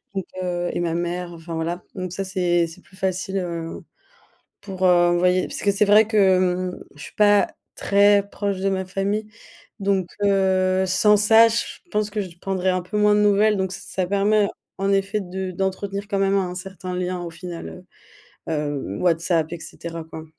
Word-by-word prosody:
donc, 190 - -1 0.2
heu, 175 -1 -2
et - - -2
ma 165 -1 -1
mère, 175 0 -3
enfin 165 0 -7
voilà. 170 +2 -3
Donc 185 -1 -5
ça 195 - -3
c'est 175 -3 +1
c'est 165 +3 -13
plus 190 - -19
facile, 190 +1 -2
heu, 170 -2 -5 0.8
pour 190 -2 -3
heu, 175 -1 +5
envoyer 180 +1 +2
parce - - -6
que 200 - +3
c'est 205 +1 +2
vrai 210 +2 +6
que 185 -3 +3
mmh, - - -10
je 145 - -11
suis - - -11
pas 205 -1 +5 0.3
très 200 0 +4
proche 200 -2 -3
de 195 +1 0
ma 190 -1 -1
famille, 200 +3 -2 0.5
donc, 195 -2 0 0.2
heu, 190 -1 +2
sans 210 +3 +4
ça, 220 +2 +6
je 230 +1 0 0.3
pense 210 0 0
que 210 - -3
je 175 -3 -9
prendrai 190 -1 -1
un 185 0 +1
peu 185 +4 -5
moins 210 0 +4
de 210 - +3
nouvelles, 210 +1 +4
donc 190 -1 -1
ç 195 - -6
ça 185 -2 -3
permet 200 +1 +2 0.3
en 195 0 +1
effet 195 +2 +1
de 185 0 -5
d'entretenir 195 +2 -3
quand 200 -2 0
même 195 0 +2
un 180 -2 -2
certain 185 -1 -6
lien 180 0 -2
au 170 - -5
final, 170 - -8 0.7
heu, - - -1
heu, 145 -9 -3
WhatsApp 170 -2 +1
et 170 - -5
cetera, 165 -1 -7
quoi. 160 0 -9
185 Hz, 195 wpm, -22 LUFS, 175-200 Hz, 0.8 s, vrai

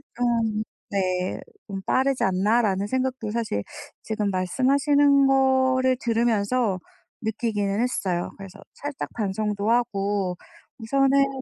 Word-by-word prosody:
좀 230 -3 0 0.3
네 185 -2 -1 0.3
좀 195 -2 -5
"빠르지 265 0 +1
않나?"라는 200 +1 +2
생각도 255 -3 -2
사실 220 - -2 0.4
지금 215 -2 -1
말씀하시는 275 +8 +3
거를 260 -1 +3
들으면서 230 -2 +1 0.4
느끼기는 215 -2 -1
했어요. 185 -8 -1
그래서 195 0 -11
살짝 285 -1 -5
반성도 210 0 -1
하고, 200 -5 0 0.4
우선은 270 +4 +2 0.2
뭐 265 - -6
225 Hz, 260 characters per minute, -24 LUFS, 200-260 Hz, 0.4 s, 말씀하시는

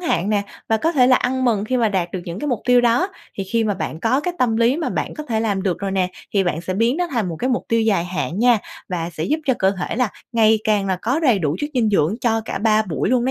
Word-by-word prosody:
hạn 200 - 0
nè, 205 -1 +2 0.3
và 225 - +3
có 320 +9 0
thể 255 -6 +4
là 255 0 +6
ăn 260 +1 -1
mừng 215 -5 +1
khi 255 +4 -1
mà 235 -3 +2
đạt 185 -4 -1
được 185 - -3
những 170 +2 -6
cái 295 - -4
mục 240 -5 -1
tiêu 245 0 +5
đó. 245 +10 +2 0.3
Thì 195 - -4
khi 225 +4 0
mà 205 -2 0
bạn 160 -3 -5
có 250 +7 +2
cái 350 +3 -3
tâm 235 -5 +2
lý 235 +4 +3
mà 330 - -2
bạn - - -3
có 305 - -6
thể 225 -5 -1
làm 200 -4 -1
được 180 -3 -1
rồi 195 +1 -3
nè, 190 -1 +1 0.3
thì 195 -1 +3
bạn 175 -2 -1
sẽ 185 +2 -4
biến 230 +6 +2
nó 355 +1 0
thành 230 -8 -1
một 165 - -5
cái 255 - -1
mục 245 - -1
tiêu 230 0 +2
dài 210 -6 +2
hạn 180 0 -3
nha, 240 0 +4 0.3
và 170 -2 -3
sẽ 155 - -3
giúp 305 +3 0
cho 260 - +3
cơ 190 - +3
thể 180 - -3
là 250 -2 +2 0.2
ngày 220 -1 +4
càng 210 -2 +1
là 190 - 0
có 255 +7 +1
đầy 250 -10 +3
đủ 155 -3 -1
chất 295 - -3
dinh 235 -3 +2
dưỡng 190 -2 +2
cho 225 -2 +1
cả - - -4
3 215 +1 +3
buổi 180 -7 -2
luôn 250 -1 +2
đó 260 - +1
220 Hz, 305 wpm, -20 LUFS, 190-250 Hz, 0.3 s, là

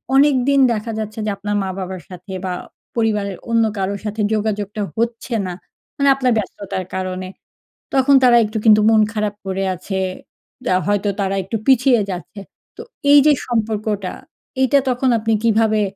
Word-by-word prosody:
অনেকদিন 275 -1 +4
দেখা 220 +1 -4
যাচ্ছে 215 0 -5
যে, - - -1
আপনার 205 +1 -3
মা-বাবার 190 -1 -5
সাথে 180 +1 -10
বা 185 - -2 0.4
পরিবারের 210 -4 0
অন্য 230 0 +3
কারোর 195 +1 -2
সাথে 215 +1 -3
যোগাযোগটা 210 -1 -2 0.2
হচ্ছে 235 +2 -2
না, 180 - -4 0.4
মানে 280 0 +3
আপনার 260 -2 +1
ব্যস্ততার 195 -2 -4
কারণে। 185 0 -4 0.6
তখন 275 +1 +4
তারা 245 -1 +6
একটু 215 +1 -4
কিন্তু 215 -1 +7
মন 220 -1 +5
খারাপ 210 -1 -2
করে 190 0 -2
আছে। 190 +2 -4 0.8
আ - - +4
হয়তো 205 0 +1
তারা 195 0 0
একটু 195 +5 -3
পিছিয়ে 255 -2 +4
যাচ্ছে। 185 +3 -7 0.4
তো - - -7 0.3
এই 290 - +9
যে 305 - +7 0.2
সম্পর্কটা, 215 -4 -2 0.5
এইটা 270 +2 +4
তখন 255 +1 +1
আপনি 225 +1 0
কীভাবে 220 -1 +3
215 Hz, 155 wpm, -19 LUFS, 195-235 Hz, 0.8 s, এই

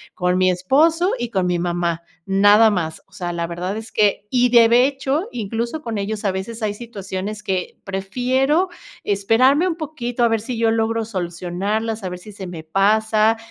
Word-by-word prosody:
con 180 0 +1
mi 185 0 +4
esposo 315 - +2
y 240 -1 -3
con 190 -4 0
mi 175 -1 0
mamá, 170 -1 -1 0.2
nada 205 +3 +5
más. 165 -5 -3
O 195 - -37
sea, 175 -1 -4
la 170 -1 -2
verdad 180 +4 -4
es 220 +1 -8
que 210 -1 +1
y 250 -1 +3
de 235 +2 +6
hecho, 280 +6 -2
incluso, 235 +6 -3
con 230 -3 -3
ellos, 210 +1 -4
a 195 - +2
veces, 220 +5 -5
hay 210 -1 0
situaciones 210 -2 -6
que 185 -1 -3
prefiero 255 - 0 0.3
esperarme 240 - +3
un 335 - -1
poquito 255 -7 -3
a - - +6
ver 225 - +1
si 235 +1 -5
yo 225 -1 +2
logro 225 0 0
solucionarlas, 195 +3 -3
a 185 - -3
ver 180 - -6
si 210 +3 -12
se 190 -2 -8
me 165 -3 -8
pasa, 215 +5 +2
215 Hz, 185 wpm, -20 LUFS, 185-240 Hz, 0.3 s, de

